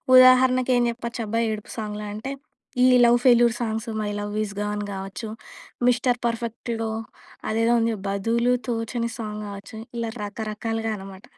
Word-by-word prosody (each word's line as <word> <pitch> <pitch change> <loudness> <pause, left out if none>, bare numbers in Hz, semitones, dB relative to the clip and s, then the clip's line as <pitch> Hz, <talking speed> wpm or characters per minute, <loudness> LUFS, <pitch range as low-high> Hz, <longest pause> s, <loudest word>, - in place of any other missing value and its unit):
ఉదాహరణకేం 255 -1 +6
జెప్పొచ్చబ్బా! 235 -2 -3
ఏడుపు 215 -1 -6
సాంగ్‌లా 210 -1 -4
అంటే, 265 +6 -4 0.5
ఈ - - +7 0.2
love 240 0 +6
failure 240 -2 +6
songs, 225 0 -2
'my 210 - -1
love 205 0 -4
is 200 - -5
gone' 210 0 -2
గావచ్చు, 195 +3 -5 0.6
మిస్టర్ 250 0 +3
పర్ఫెక్ట్‌లో 230 -1 -2 0.6
అదేదో 230 +2 +2
ఉందిగా 225 -1 +1
'బదులు 230 +5 +1
తోచని' 230 0 -2
సాంగ్ 210 -2 -5
గావచ్చు, 200 +2 -8 0.2
ఇలా 230 -1 -1
రకరకాలుగా 225 +2 -3
అనమాట. 195 -1 -10
225 Hz, 130 wpm, -24 LUFS, 210-240 Hz, 0.6 s, ఈ